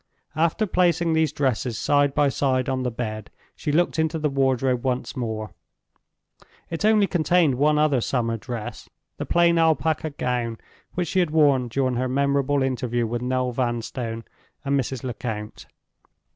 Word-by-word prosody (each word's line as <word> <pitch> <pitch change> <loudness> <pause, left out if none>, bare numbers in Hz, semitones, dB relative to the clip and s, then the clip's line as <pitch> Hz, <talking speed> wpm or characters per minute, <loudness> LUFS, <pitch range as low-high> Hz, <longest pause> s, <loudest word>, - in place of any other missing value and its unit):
After 165 +7 +1
placing 170 -3 +2
these 160 -2 +2
dresses 130 -5 -1
side 145 -1 +2
by 145 -1 +3
side 130 -1 0
on 130 -1 -1
the 125 - -1
bed, 110 -3 -5 0.3
she 150 - -3
looked 165 +1 +1
into 160 +1 +1
the 150 -2 -1
wardrobe 130 -2 +1
once 130 +1 -2
more. 110 -4 -4 1.2
It 165 +3 -3
only 215 -1 +5
contained 170 -4 +2
one 150 +4 +2
other 150 -4 +3
summer 115 -2 -1
dress—the 115 -1 -8
plain 170 -1 +3
alpaca 160 0 +1
gown 120 -5 -2 0.4
which 175 -3 -1
she 190 - +1
had 175 -3 +2
worn 145 -5 +3
during 130 +1 0
her 130 +1 -1
memorable 140 +1 +1
interview 125 -2 -1
with 120 +1 -3
Noel 125 0 0
Vanstone 120 -1 -3 0.4
and 140 0 +1
Mrs. 130 -1 -4
Lecount. 110 -4 -5
135 Hz, 150 wpm, -24 LUFS, 120-155 Hz, 1.2 s, only